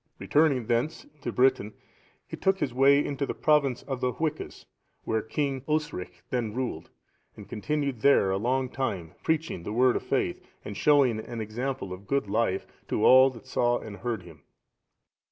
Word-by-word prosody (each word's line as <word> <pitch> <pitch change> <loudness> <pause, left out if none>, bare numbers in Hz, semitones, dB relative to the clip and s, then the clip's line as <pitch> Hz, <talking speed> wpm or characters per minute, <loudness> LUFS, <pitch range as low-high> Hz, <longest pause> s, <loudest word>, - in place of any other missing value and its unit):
Returning 145 -6 +2
thence 120 +7 -1
into 140 -5 -7
Britain, 125 -4 +2 0.5
he - - -6
took 190 0 +1
his 130 -9 -2
way 140 +3 +5
into 140 -1 -2
the - - -3
province 145 -5 +2
of 135 -2 -5
the 125 -1 0
Hwiccas,(698) 155 -1 -4 0.4
where 110 0 0
King 135 +3 -2
Osric 150 - -3
then 115 -4 -2
ruled,(699) 125 -11 -4 0.5
and - - -11
continued 140 0 -2
there 110 -8 +4
a 95 - +1
long 130 +5 0
time, 100 -12 -3
preaching 160 - -1
the 95 - -6
Word 125 +3 +3
of - - -1
faith, - - -1 0.2
and 105 - -6
showing 135 -6 +3
an 115 +1 -6
example 110 -1 -4
of 95 +2 -11
good 140 -5 0
life 100 -2 0 0.2
to 105 - 0
all 130 +1 +8
that 130 -1 -12
saw 120 -2 +1
and 105 -2 -8
heard 115 -6 -3
him. 85 -3 -14
125 Hz, 170 wpm, -27 LUFS, 110-140 Hz, 0.5 s, all